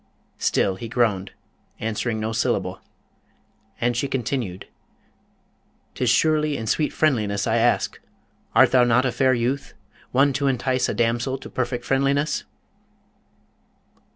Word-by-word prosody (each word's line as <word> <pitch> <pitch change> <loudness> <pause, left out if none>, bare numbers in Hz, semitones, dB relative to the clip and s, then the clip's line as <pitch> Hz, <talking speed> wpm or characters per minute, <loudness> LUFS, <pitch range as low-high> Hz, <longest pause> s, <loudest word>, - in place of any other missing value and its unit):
Still 95 -1 +1
he 115 - -6
groaned, 105 -5 +1 0.5
answering 110 +1 -2
no 110 +1 -2
syllable. 110 - -1 1.0
And 120 0 +1
she 130 +4 0
continued, 120 -7 -3 1.3
''Tis 125 - 0
surely 150 +3 +2
in 110 - -5
sweet 150 +7 0
friendliness 105 -10 +1
I 110 - +1
ask. 120 +1 +1 0.6
Art - - +6
thou 125 -1 +5
not 120 +2 +3
a 125 - +1
fair 130 +2 +2
youth, 125 +4 -2 0.4
one 135 +2 +3
to 140 +1 0
entice 130 0 0
a - - -2
damsel 120 +3 0
to - - -11
perfect 125 -1 -2
friendliness?' 140 +2 +1
125 Hz, 125 wpm, -23 LUFS, 115-135 Hz, 1.3 s, Art